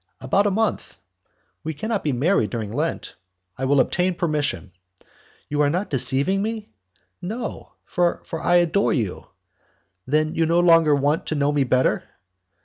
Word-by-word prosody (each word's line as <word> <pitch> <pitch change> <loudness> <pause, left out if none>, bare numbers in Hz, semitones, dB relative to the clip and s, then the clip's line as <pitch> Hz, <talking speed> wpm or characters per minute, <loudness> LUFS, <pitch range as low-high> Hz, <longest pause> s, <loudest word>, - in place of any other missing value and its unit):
"About 195 +11 +1
a - - +3
month." 220 +3 -2 0.7
"We 160 -1 -4
cannot 220 +4 -3
be 150 - 0
married 155 +11 +1
during 110 -4 -4
Lent." 155 +5 -3 0.4
"I 130 - -3
will 140 +1 +3
obtain 180 +7 +1
permission." 150 - -2 0.8
"You 150 0 -1
are 145 - +3
not 180 +6 -2
deceiving 140 +8 +4
me?" 220 0 -4 0.5
"No, 225 +7 -6
for 175 -1 -1
I 170 +2 +1
adore 175 +3 +2
you." 110 - -3 0.8
"Then, 155 +3 +1
you 165 -1 +1
no 170 +2 +2
longer 165 -4 +5
want 145 +3 0
to 155 - -2
know 145 0 +1
me 145 -2 +1
better?" 130 +1 +1
155 Hz, 150 wpm, -22 LUFS, 140-180 Hz, 0.8 s, longer